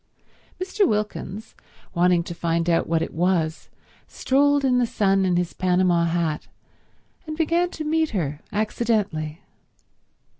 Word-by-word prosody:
Mr. 380 +2 +1
Wilkins, 210 - -3 0.4
wanting 175 -1 +3
to 170 - -6
find 170 0 -1
out 170 -1 +2
what 165 0 +1
it - - -6
was, 165 -2 0 0.4
strolled 285 +1 +2
in 250 -1 +3
the 245 - +2
sun 195 -3 +2
in 180 -1 +2
his 175 0 -1
Panama 180 -2 +2
hat, 165 -2 -1 0.8
and 310 0 -5
began 340 +2 +1
to 315 - -6
meet 315 0 +1
her 155 -7 -3
accidentally. 205 -7 -1
185 Hz, 135 wpm, -23 LUFS, 170-250 Hz, 0.8 s, wanting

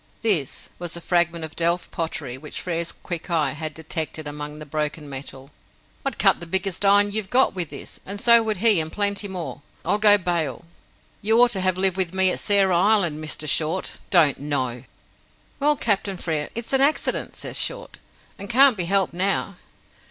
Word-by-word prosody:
"This" 180 - +1
was 175 -1 -4
a - - -7
fragment 170 -1 0
of 155 - -11
delft 170 +1 0
pottery 155 -6 -4
which 150 +3 -6
Frere's 170 -1 -3
quick 175 0 -7
eye 155 -5 +1
had 155 +2 -5
detected 160 -1 -4
among 150 0 -7
the 155 - -9
broken 150 0 -4
metal. 135 0 -8 0.5
"I'd - - -3
cut - - +4
the 170 - -8
biggest 190 +2 0
iron 205 +1 +4
you've 210 -2 -4
got 260 +3 +3
with 175 -5 -3
this; - - -8
and 200 +1 -6
so 235 +1 +7
would 220 -2 -2
he 215 -2 +5
and 160 0 -3
plenty 205 0 0
more, 180 -6 -6 0.2
I'll 205 - +1
go 205 -1 +7
bail. 170 -3 -2 0.6
You 220 +3 +2
ought 245 0 +5
to 190 - 0
have 185 -1 +1
lived 190 -1 +1
with 185 -1 0
me 190 -1 +5
at - - -2
Sarah 195 -3 +3
Island, 180 -6 +2
Mr. 155 0 -4
Short. 160 +5 0
Don't 160 -7 +4
know!" 130 -4 -3 0.7
"Well, 295 +1 +3
Captain 200 -6 -1
Frere, 155 -4 -3
it's 235 +3 -6
an 270 - +3
accident," 290 +3 0
says - - -5
Short, - - -4 0.4
"and 200 - -8
can't 260 +1 +5
be 180 - -1
helped 195 0 +1
now." 195 +1 -1
175 Hz, 190 wpm, -23 LUFS, 155-200 Hz, 0.7 s, so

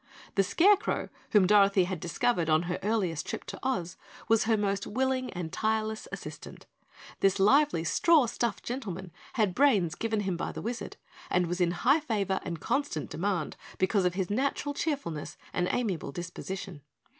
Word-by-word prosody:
The 195 - +4
Scarecrow, 400 - +3 0.2
whom 205 -3 +5
Dorothy 200 -1 +5
had 180 -1 -3
discovered 170 +1 0
on 155 +1 +4
her 175 0 -3
earliest 195 -6 0
trip - - -4
to - - -8
Oz, 185 -9 -2 0.3
was 225 -1 +3
her 220 -1 +3
most 200 -1 -1
willing 260 +2 0
and 175 -3 -5
tireless 220 0 -1
assistant. - - -8 0.5
This 195 0 +3
lively 270 - +4
straw 315 - +4
stuffed 235 -2 -2
gentleman 190 -8 -5 0.2
had 210 -6 +1
brains 205 - +3
given 220 +2 -1
him 190 -3 -2
by - - -3
the - - -6
Wizard 235 +2 -5 0.3
and 180 0 +2
was 175 +2 -2
in 175 - +4 0.2
high 280 +5 +6
favor 205 - -1
and 170 -3 -4
constant 275 - -2
demand 180 -2 -1 0.2
because 190 +1 +2
of 180 0 +1
his 190 0 -2
natural 280 +5 0
cheerfulness 275 - -3 0.2
and 180 0 +1
amiable 200 - -1
disposition. 175 0 -6
200 Hz, 165 wpm, -29 LUFS, 180-240 Hz, 0.5 s, high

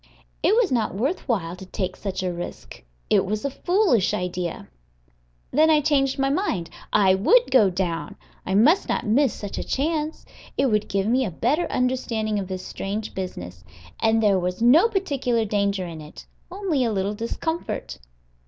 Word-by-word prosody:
It 420 - +3
was 465 - +2
not 225 -6 0
worth 270 - -2
while 175 -7 -1
to 185 - -11
take 185 -1 -3
such 190 -2 -4
a 180 -1 -1
risk; 175 0 -8 0.3
it - - +5
was 215 +5 -3
a 280 - -1
foolish 350 - +2
idea. 180 -1 -4 0.8
Then 310 +3 +4
I 310 -1 +5
changed 280 -3 +1
my 270 0 +1
mind: 275 - -1 0.2
I 195 -3 +4
would 465 - +4
go 220 -7 +5
down. 175 -2 -3 0.3
I 190 - -2
must 300 - +4
not - - -1
miss 250 +4 +3
such 205 -1 -6
a - - -3
chance; 310 +2 -2 0.3
it 265 - +2
would 210 0 0
give 195 -1 0
me 250 +4 +2
a 220 - -2
better 255 - 0
understanding 230 -4 -1
of 190 - -4
this 185 -1 -5
strange 210 +2 -4
business; 90 - -6 0.4
and 225 0 +2
there 200 -3 +4
was 180 0 -3
no 275 - +6
particular 275 - 0
danger 200 -2 0
in 165 -2 -8
it, 150 0 -12 0.2
only 360 -7 -1
a 230 - 0
little 200 0 -1
discomfort. 280 - -4
220 Hz, 175 wpm, -24 LUFS, 190-280 Hz, 0.8 s, no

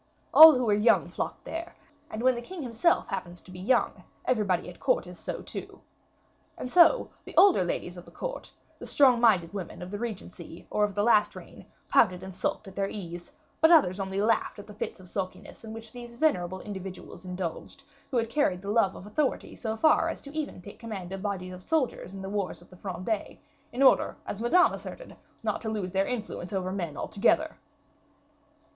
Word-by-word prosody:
All 315 0 +12
who 250 -1 0
were 210 - +3
young 210 +3 +3
flocked - - -4
there, 335 +1 -6 0.3
and 220 +2 -5
when 255 0 +5
the 240 - -5
king 335 +6 -7
himself 245 +8 +1
happens 180 -2 -5
to 185 - -15
be 180 - -9
young, 240 +7 +1 0.2
everybody 205 -8 +1
at - - -10
court - - +1
is - - -11
so - - -5
too. - - -8 0.8
And 250 - -6
so, 360 +8 +5
the - - -10
older 385 - +7
ladies 175 0 -3
of 175 - -10
the - - -14
court, - - -6 0.3
the - - -7
strong 255 -4 +5
minded 195 -7 +4
women 185 -3 -6
of 180 - -8
the 205 - -4
regency, 180 -7 -7
or 210 - +2
of 205 -1 0
the 205 - +1
last 215 -2 +4
reign, - - -12 0.2
pouted 185 -4 +3
and 190 0 -8
sulked 190 +3 -2
at 195 - -11
their 195 0 -1
ease; 175 -4 -7 0.3
but 320 - +7
others 205 - +5
only 190 0 -2
laughed 220 +2 +1
at 205 - -9
the 210 - -12
fits 205 - -5
of 185 - -14
sulkiness 185 +3 -6
in 220 - -8
which 225 0 -9
these 240 -1 -10
venerable 185 - 0
individuals 190 -3 -8
indulged, 180 -2 -6 0.3
who 255 - -1
had 230 -1 +1
carried 225 -8 0
the 200 - -3
love 210 -4 +2
of - - -10
authority 260 +7 -1
so 220 -2 -3
far 315 +6 +4
as - - -6
even 305 0 -4
to - - -12
take 200 - -12
command 200 -6 -6
of 195 0 -5
bodies 190 -3 -4
of 180 - -10
soldiers 265 - -1
in 195 0 -8
the - - -5
wars 200 -2 -3
of 175 - -19
the - - -13
Fronde, 190 +3 -4 0.3
in 255 +3 0
order, 265 - +4
as 205 - -5
Madame 355 +10 +4
asserted, - - -9 0.3
not - - -1
to 220 - -3
lose 205 -4 -3
their 195 +1 +1
influence 215 -7 -4
over 185 -2 -2
men 170 -6 -4
altogether. 315 - +1
205 Hz, 205 wpm, -28 LUFS, 185-245 Hz, 0.8 s, All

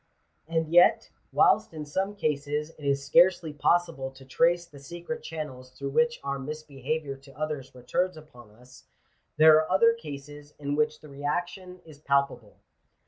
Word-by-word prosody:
"^ - - -45 0.4
And 160 -1 0
yet, 175 +1 +5 0.2
whilst - - +3
in 150 -1 -5
some 190 +7 -2
cases 150 -3 -2
it 155 - -17
is 140 0 0
scarcely 170 -1 +4
possible 150 -1 +1
to 135 0 -16
trace 170 +6 +2
the 150 -5 -15
secret 175 +11 -7
channels 150 -6 -7
through 135 +2 -6
which 235 +8 +2
our 140 0 -3
misbehaviour 145 0 -4
to 135 0 -18
others 150 -4 -4
returns 175 +8 -1
upon 125 -8 -15
us, 125 +4 -18 0.5
there 155 0 +8
are 155 0 0
other 230 +5 +5
cases 145 -6 -10
in 145 -1 -3
which 150 0 0
the 155 - -13
reaction 175 +6 -4
is 155 -3 -14
palpable. 140 -7 -1
150 Hz, 160 wpm, -27 LUFS, 140-170 Hz, 0.5 s, there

